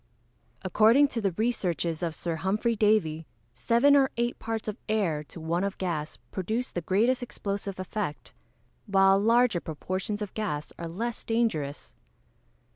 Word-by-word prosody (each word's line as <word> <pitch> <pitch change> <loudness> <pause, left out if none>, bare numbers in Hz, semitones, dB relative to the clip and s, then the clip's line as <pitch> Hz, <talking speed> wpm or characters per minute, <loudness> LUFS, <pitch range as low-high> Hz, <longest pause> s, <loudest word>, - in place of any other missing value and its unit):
_ - - -41 0.6
According 225 +9 +5
to 230 - -3
the 195 -2 +1
researches 175 -6 -1
of 165 -2 -2
Sir 170 -2 -3
Humphrey 210 +7 0
Davy, 205 -8 +2 0.3
seven 235 - +4
or 270 -2 +5
eight 240 +1 -1
parts 225 -1 -4
of 215 +2 -4
air, 180 -9 +1
to 165 - -10
one 165 +3 -1
of 200 -1 -2
gas, 160 -5 -3
produce 220 +7 -2
the 175 - -3
greatest 225 +9 +2
explosive 200 -5 -4
effect; 185 -4 -4 0.5
while 195 -1 +5
larger 230 -3 +3
proportions 185 +7 -3
of 205 - -7
gas 150 -9 -3
are 170 - -4
less 225 +8 -4
dangerous. 190 -12 -1
200 Hz, 150 wpm, -28 LUFS, 170-225 Hz, 0.6 s, According